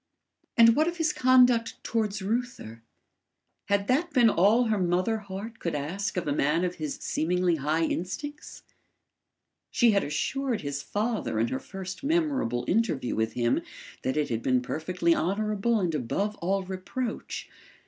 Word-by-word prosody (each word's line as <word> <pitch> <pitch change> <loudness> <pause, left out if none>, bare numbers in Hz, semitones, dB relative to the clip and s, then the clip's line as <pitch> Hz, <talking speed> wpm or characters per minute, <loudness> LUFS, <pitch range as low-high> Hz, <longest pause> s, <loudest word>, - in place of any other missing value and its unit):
And 230 0 +7
what 310 +2 +3
of 345 0 -2
his 325 -2 +1
conduct 250 -2 +4
towards 215 -3 -1
Reuther? 215 - -3 0.8
Had 200 0 0
that 300 +7 +2
been 240 -5 +5
all 205 +8 +4
her 220 -3 0
mother 185 +5 +1
heart 205 +3 -8
could 170 - -2
ask 175 +8 -3
of 180 - -2
a 145 - +1
man 150 +5 +1
of 180 0 -2
his 150 -2 -2
seemingly 175 +1 0
high 155 +3 0
instincts? 240 - -4 1.1
She 240 -2 +4
had 200 -1 +2
assured 250 - -1
his 140 -1 -4
father 210 - -2
in 115 +1 +1
her 130 - -2
first 190 +1 -8
memorable 280 - 0
interview 180 - 0
with 110 0 -1
him 120 -1 +1 0.4
that 130 +3 -1
it 150 - 0
had 115 -1 -2
been 125 0 +1
perfectly 170 +5 0
honourable 215 +5 0
and 175 -4 0
above 195 - -1
all 195 +3 -1
reproach. 190 +6 -5
195 Hz, 155 wpm, -27 LUFS, 155-230 Hz, 1.1 s, And